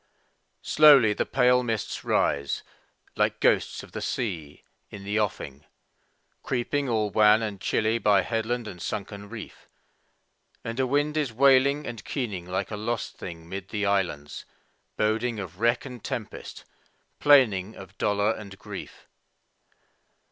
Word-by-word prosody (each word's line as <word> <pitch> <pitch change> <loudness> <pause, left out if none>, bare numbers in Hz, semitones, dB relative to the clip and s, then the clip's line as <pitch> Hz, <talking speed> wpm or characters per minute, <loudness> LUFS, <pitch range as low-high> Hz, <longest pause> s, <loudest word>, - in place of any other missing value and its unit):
Slowly 140 -8 +6
the - - -2
pale 125 -1 +4
mists 115 -4 -3
rise, 70 0 0 0.5
like - - +1
ghosts - - +1
of - - -14
the - - -6
sea, 85 - -4 0.3
in 100 - -9
the 105 +2 -1
offing, 75 -9 -3 0.8
Creeping 135 +3 -1
all 110 -3 0
wan 110 +1 +5
and 100 -3 -5
chilly 110 +1 +1
by 100 -4 +4
headland 115 +1 -2
and 90 -4 -9
sunken 100 +2 -5
reef, 110 -2 -10 0.9
And 115 +2 -5
a 130 - +2
wind 145 +3 0
is 145 -6 0
wailing 140 +3 +4
and 115 -3 -7
keening 105 -10 -4
like 95 +3 -3
a 105 - -4
lost 115 +2 -3
thing 85 -2 -8
'mid 95 +1 -7
the 105 -2 -2
islands, 90 -8 -1 0.5
Boding 110 +1 0
of 90 -2 -8
wreck 120 +3 +2
and 125 -4 -9
tempest, - - -6 0.5
plaining 110 -9 +4
of 95 +1 -12
dolor 105 +1 +2
and 100 -3 -10
grief. - - -9
110 Hz, 140 wpm, -26 LUFS, 100-125 Hz, 0.9 s, Slowly